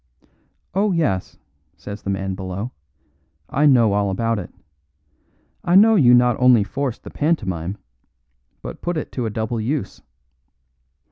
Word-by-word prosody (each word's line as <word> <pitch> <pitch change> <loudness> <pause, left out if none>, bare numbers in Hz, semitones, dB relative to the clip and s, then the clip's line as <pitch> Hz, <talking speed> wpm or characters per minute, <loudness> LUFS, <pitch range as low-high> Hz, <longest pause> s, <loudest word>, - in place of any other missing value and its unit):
"Oh, 200 +2 +1
yes," 145 - -1 0.4
says 100 0 -8
the - - -5
man 95 0 -2
below, 95 +5 -5 0.8
"I 150 +3 +3
know 120 -7 +4
all 100 0 +1
about 115 +3 -1
it. 90 - -8 1.1
I 175 - +2
know 220 +3 +7
you 125 - +6
not 120 -1 +4
only 125 -4 +6
forced 135 +3 -4
the - - -10
pantomime, 95 - -1 0.9
but - - -8
put 175 -1 -2
it 155 - -5
to 125 -3 -3
a - - -2
double 110 +2 -3
use. 135 +6 -3
115 Hz, 140 wpm, -21 LUFS, 100-145 Hz, 1.1 s, know